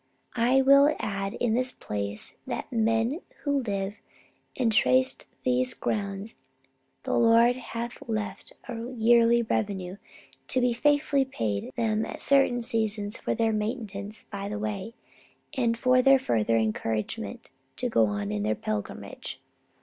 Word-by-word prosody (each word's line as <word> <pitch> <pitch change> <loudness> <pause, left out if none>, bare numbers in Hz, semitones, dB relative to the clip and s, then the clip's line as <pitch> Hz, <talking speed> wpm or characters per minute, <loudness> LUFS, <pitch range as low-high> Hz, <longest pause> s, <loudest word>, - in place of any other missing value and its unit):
I 250 +3 +4
will 280 +2 +6
add 195 -1 -3
in 240 -3 0
this 250 +2 +1
place 100 0 -5
that - - -3
to - - -6
the 225 - +2
men 225 - +1 0.2
who 285 -2 +1
live 200 -2 -3 0.6
and 240 -3 +2
trace 130 -8 +4 0.3
these 125 0 +1
grounds 200 0 -3 0.7
the - - -2
Lord 235 +1 +5
hath 235 -1 -6
left 210 -3 -3 0.2
a 235 -1 -5
yearly 235 +1 +5
revenue 195 -4 -2 0.5
to 255 - +1
be 245 -1 +2
faithfully 290 +1 +2
paid 110 - -3
them 220 -1 +1
at - - -6
certain 270 -3 +3
seasons 220 -2 -2
for - - -1
their 225 -1 +1
maintenance 210 -2 -4
by 200 -1 -6
the 210 - -3
way, 215 +1 -4 0.6
and 235 -3 +1
for 255 +1 +4
their 270 +1 +6
further 115 - +1
encouragement 115 - -2 0.2
to 250 - -1
go 115 - +3
on 100 0 -3
in 105 -1 -2
their 105 +1 0
pilgrimage. 105 +5 -5
225 Hz, 145 wpm, -27 LUFS, 195-245 Hz, 0.7 s, will